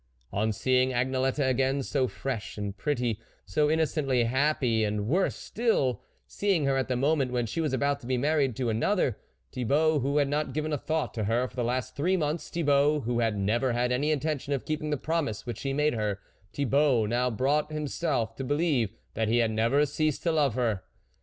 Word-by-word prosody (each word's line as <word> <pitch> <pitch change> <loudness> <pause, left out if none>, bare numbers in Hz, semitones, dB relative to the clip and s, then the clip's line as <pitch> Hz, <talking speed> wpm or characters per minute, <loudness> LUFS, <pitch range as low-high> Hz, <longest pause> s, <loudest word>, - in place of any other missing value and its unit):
On 110 +3 +1
seeing 130 +4 +2
Agnelette 130 +2 0
again, 135 +2 +1
so 130 -1 0
fresh 125 -6 -5
and 100 -1 -4
pretty, 120 -1 -1 0.3
so 150 +11 +1
innocently 150 -5 +1
happy, 125 -2 +1
and, 105 -1 -1
worse 185 +9 +1
still, 220 - 0 0.2
seeing 195 -7 0
her 135 -1 +2
at 135 - 0
the 130 - 0
moment 135 0 +1
when 120 -1 0
she 140 +9 -3
was 155 -4 0
about 140 +2 0
to 120 - -11
be 130 -1 +1
married 140 -2 +1
to 120 -1 -1
another, 125 - +1 0.3
Tbi 125 -2 -3
bault, 155 +2 +3
who 140 +3 0
had 145 -1 +3
not 150 +2 -1
given 155 0 -2
a - - +1
thought 160 +3 -2
to 110 -4 -2
her 120 +4 +1
for - - -17
the 125 - -1
last 125 +1 -2
three 180 +6 +1
month, 155 0 -1
Thibault, 150 -2 +2
who 120 -1 -1
had 115 -3 +1
never 120 +6 +1
had 125 +1 0
any 140 +5 +1
intention 150 -1 -1
of 135 - -3
keeping 155 0 -2
the 150 - 0
promise 150 -7 -2
which 120 - -5
he 135 - -2
made 150 +2 +1
her, 105 -3 -1 0.3
Thibault 140 -3 +2
now 120 +3 +1
brought 145 +6 0
himself 145 -6 -2
to 135 - -4
believe 145 - +1 0.2
that 110 -1 -1
he 115 +2 +2
had 115 -2 +2
never 115 +7 +2
ceased 155 +1 -1
to 170 - +2
love 145 -7 +2
her. 115 -6 0
135 Hz, 205 wpm, -28 LUFS, 120-150 Hz, 0.3 s, bault